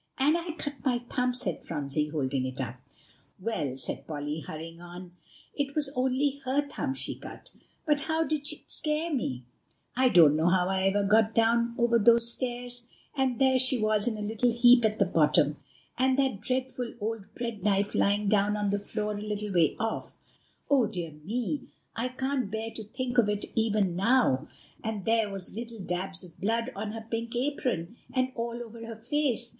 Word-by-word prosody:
"And 290 +4 +3
I 340 -1 -3
cut 285 -3 -6
my 255 -3 +2
thumb," 250 -1 0
said 185 -10 -2
Phronsie, 145 +1 0
holding 140 -3 -1
it 130 +1 -7
up. 130 -1 -4 0.6
"Yes," 140 - -2
said - - -4
Polly, 150 0 -4
hurrying 165 +2 -8
on; 175 0 -10 0.4
"it 280 -1 -3
was 290 -3 +3
only 265 +2 +1
her 275 +3 0
thumb 275 -1 -3
she - - -1
cut, - - -11 0.3
but 295 -2 +2
how 320 +2 0
it - - -6
did 295 -2 -1 0.2
scare 310 +2 -1
me! 130 - -2 0.5
I 255 0 +4
don't 160 -8 +7
know 160 +2 +2
how 180 0 +3
I 190 0 +2
ever 200 +1 +2
got 220 +2 +3
down 235 +1 +3
over 235 -1 +3
those 235 +2 +6
stairs; 245 -1 -3 0.3
and 265 -3 +1
there 265 -1 +4
she 255 0 +2
was 215 0 +2
in 225 -3 0
a 210 - -4
little 225 +3 +1
heap 240 +1 +6
at 215 0 +1
the 200 - +3
bottom, 150 -3 +3 0.4
and 260 0 +3
that 265 -7 +1
dreadful 255 0 -3
old 220 0 -3
bread 235 -5 -5
knife 200 0 +1
lying 205 +1 +2
down 205 0 +2
on 205 -1 0
the 205 - 0
floor 210 +1 -3
a 205 - -5
little 210 -1 -2
way 165 -4 +3
off. 225 +1 -3 0.5
Oh, 270 -6 +4
dear 175 -6 -5
me! 235 - -4 0.3
I 235 +2 -1
can't 260 -2 -2
bear 220 +2 -4
to 220 - -5
think 245 +3 -1
of 215 -3 +4
it 210 0 +1
even 210 -5 +1
now; 210 - +3 0.4
and 220 -3 -3
there 225 -2 +2
were 195 -1 -5
little 230 +1 -6
dabs 185 +1 0
of 175 -2 -13
blood 230 +5 0
on 210 +1 -4
her 225 0 -7
pink 230 +1 -3
apron, 245 - -2
and 255 0 0
all 235 0 -4
over 230 0 -10
her 230 - -6
face. 240 0 0
225 Hz, 190 wpm, -28 LUFS, 195-255 Hz, 0.6 s, don't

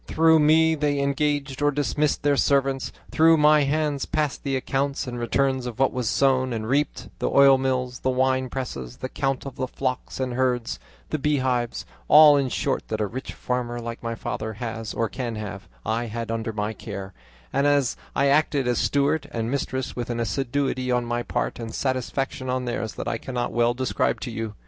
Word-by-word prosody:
Through 160 0 +4
me 160 +2 +5
they 145 -2 0
engaged 140 0 0
or 145 - +4
dismissed 145 +1 0
their 145 0 +3
servants; 135 -1 +1 0.2
through 165 +1 +5
my 150 -1 +5
hands 145 -1 0
passed 150 -2 -1
the 135 -1 -1
accounts 135 +1 -1
and 120 -1 -5
returns 130 +2 0
of 120 - -6
what 135 +1 +2
was 125 -4 -1
sown 130 0 +2
and 110 -1 -3
reaped; 145 +4 0
the - - 0
oil 140 -1 +6
mills, 125 -2 -1
the 130 - 0
wine 130 0 +1
presses, 70 - -5
the 130 - -5
count 135 -1 -2
of 135 - -7
the 130 - -1
flocks 130 0 -3
and 130 -1 -1
herds, 125 -2 0 0.3
the 155 - 0
beehives, 130 -4 0 0.2
all 150 -1 +9
in 140 -2 +1
short - - -1
that 110 - -3
a 105 - +1
rich 125 +6 -6
farmer 120 -1 -3
like 115 0 -6
my 115 0 -3
father 110 0 -4
has 115 0 -5
or 115 - +1
can 120 -1 -4
have, 105 -2 -6 0.2
I 115 +2 0
had 115 +1 -4
under 115 0 -2
my 105 0 -2
care, 100 -3 -7 0.4
and 140 +1 +2 0.5
I 140 - +3
acted 140 -2 +2
as 120 - +1
steward 145 +1 +1
and 115 -2 -2
mistress 130 -2 -2
with 120 0 -4
an 120 -1 -2
assiduity 130 +2 -1
on 125 -1 +1
my 120 0 -1
part - - -2
and 115 -1 -6
satisfaction 130 0 -2
on 130 0 -1
theirs 115 -2 -3
that - - -5
I 115 - -1
cannot 125 -2 -3
well 120 0 +2
describe 130 0 0
to 120 - -4
you. 110 -1 -4
130 Hz, 195 wpm, -24 LUFS, 120-140 Hz, 0.5 s, all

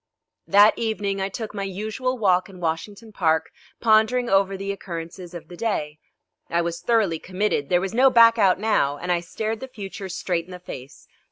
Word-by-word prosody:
That 205 +2 +6
evening 205 -4 -1
I 190 - -1
took 215 +2 -6
my 200 - -4
usual 215 +7 -3
walk 185 -5 +2
in 185 -2 -12
Washington 185 +7 -4
Park, 160 -5 +1 0.3
pondering 235 +2 +3
over 195 0 +3
the 195 +1 -3
occurrences 175 -1 -7
of 170 - -8
the 175 - -10
day. 155 -8 -2 0.5
I 170 - +1
was 170 0 -4
thoroughly 200 -5 +1
committed. 185 -6 -1
There 175 - +4
was 195 +1 -3
no 260 +3 +5
back 230 -2 +6
out 190 -3 +4
now, 195 -10 +1
and 180 +4 -3
I 175 - +2
stared 215 +6 -4
the 265 - -7
future 195 -5 -8
straight 175 -2 -2
in 185 - -14
the 180 - -7
face. 135 -6 -10
195 Hz, 190 wpm, -23 LUFS, 175-220 Hz, 0.5 s, That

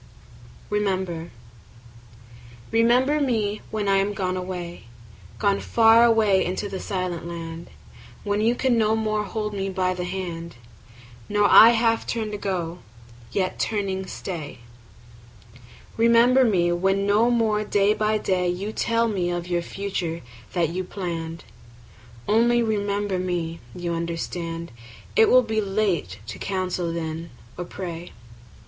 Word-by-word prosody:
Remember 190 -5 -1 1.4
REMEMBER 250 +6 +3
me 215 -6 0
when 215 -2 -2
I 195 0 +4
am 200 +1 0
gone 185 -1 -1
away, 180 -6 -6 0.5
Gone 200 -1 +1
far 225 0 +5
away 220 -5 +4
into 185 +3 -2
the 195 -1 -5
silent 180 -4 -3
land; 165 -1 -7 0.5
When 205 0 0
you 230 +3 +3
can 245 -2 +2
no 220 0 +3
more 215 -1 0
hold 210 +1 -3
me 195 -1 -2
by 185 -1 0
the 180 -1 -4
hand, 175 -4 -5 0.7
Nor 205 0 +3
I 225 - +10
half 225 0 +1
turn 220 -3 -2
to 210 - -4
go, 180 -3 -3 0.5
yet 185 -1 -1
turning 195 -3 -1
stay. 155 -9 -6 1.4
Remember 235 +3 +5
me 180 -7 +2
when 195 +3 +1
no 210 +4 +3
more 220 -3 +2
day 205 0 +2
by 215 0 +1
day 180 -3 0
5 180 0 -2
You 205 +2 -3
tell 230 +1 +1
me 185 -5 -1
of 175 0 -4
our 175 0 +1
future 175 -3 -4 0.3
that 170 -3 +1
you 185 +3 -3
plann'd: 170 -3 -5 0.8
Only 235 +2 +3
remember 205 -3 -1
me; 175 -2 -2 0.2
you 175 -1 -3
understand 170 0 -4 0.4
It 445 -1 +6
will 255 0 +6
be 220 -1 -1
late 195 - -1
to 110 - -8
counsel 185 -3 -2
then 165 0 -4 0.3
or 180 - -5
pray. 175 -1 -7
195 Hz, 140 wpm, -24 LUFS, 175-215 Hz, 1.4 s, I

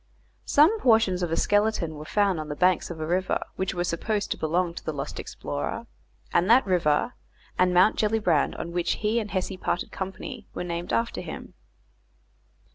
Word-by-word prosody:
Some 330 +10 +5
portions 220 - +3
of 175 -2 -1
a 165 - 0
skeleton 205 -6 +1
were 150 0 -8
found 200 -1 +1
on 155 0 -5
the 145 - -3
banks 180 +2 +2
of 170 -2 -7
a 155 - -2
river, 180 +3 0 0.2
which 190 0 -2
were 175 - 0
supposed 200 +5 -2
to - - +1
belong 170 +2 0
to - - -8
the 155 - -2
lost 140 +1 -5
explorer, 70 0 -4 0.5
and 175 +4 +3
that 245 +3 +6
river, 180 +2 +1 0.5
and 180 0 +4
Mount 180 +4 +4
Gellibrand, 210 -9 +2
on 170 - -5
which 175 0 0
he 220 +3 +2
and 210 -2 -4
Hesse 190 0 -2
parted 175 - -2
company, 195 +5 -6
were - - -3
named 170 0 -4
after 230 0 0
him. - - -8
185 Hz, 185 wpm, -26 LUFS, 170-210 Hz, 0.5 s, that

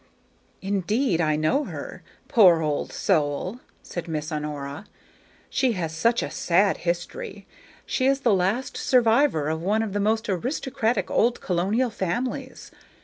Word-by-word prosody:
"Indeed, 200 +1 0
I 155 -2 +2
know 205 - +1
her, - - -7 0.3
poor 180 -8 +6
old 150 -1 -1
soul!" 165 - 0 0.2
said 175 - -6
Miss 155 -1 -3
Honora; 150 +2 -5 0.6
"she 255 -3 +1
has 165 -5 -3
such 230 +8 +2
a - - -4
sad 190 +3 +2
history. 175 - -4 0.4
She 260 - 0
is 275 0 +2
the 235 -5 +3
last 195 +8 0
survivor 235 - +3
of 160 +1 -2
one 210 +5 +1
of 210 -3 -4
the 205 - 0
most 220 +2 +1
aristocratic 230 - -1
old 240 +2 +2
colonial 200 +8 0
families. 250 +8 -4
195 Hz, 140 wpm, -25 LUFS, 165-240 Hz, 0.6 s, poor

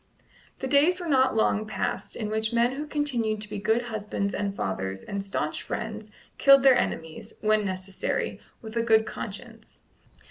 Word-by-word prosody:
The 265 - -1
days 300 +7 +4
were 350 - -5
not 260 -5 +3
long 215 -1 +2
passed 215 - -3
in 215 -2 -3
which 220 0 0
men 235 +1 +3
who 295 +3 -5
continued 245 -8 0
to 210 - -5
be 205 - -4
good 220 +4 +1
husbands 210 -3 -3
and 200 -1 -2
fathers 95 - -3
and 200 -1 -4
staunch 155 -6 -2
friends 215 -1 -5 0.3
killed 275 -1 +7
their 265 -2 +7
enemies, 165 +5 -3
when 215 0 +3
necessary, 185 0 -3 0.2
with 220 0 -8
a 230 - +2
good 220 -1 +4
conscience. - - -8
220 Hz, 170 wpm, -27 LUFS, 200-250 Hz, 0.3 s, killed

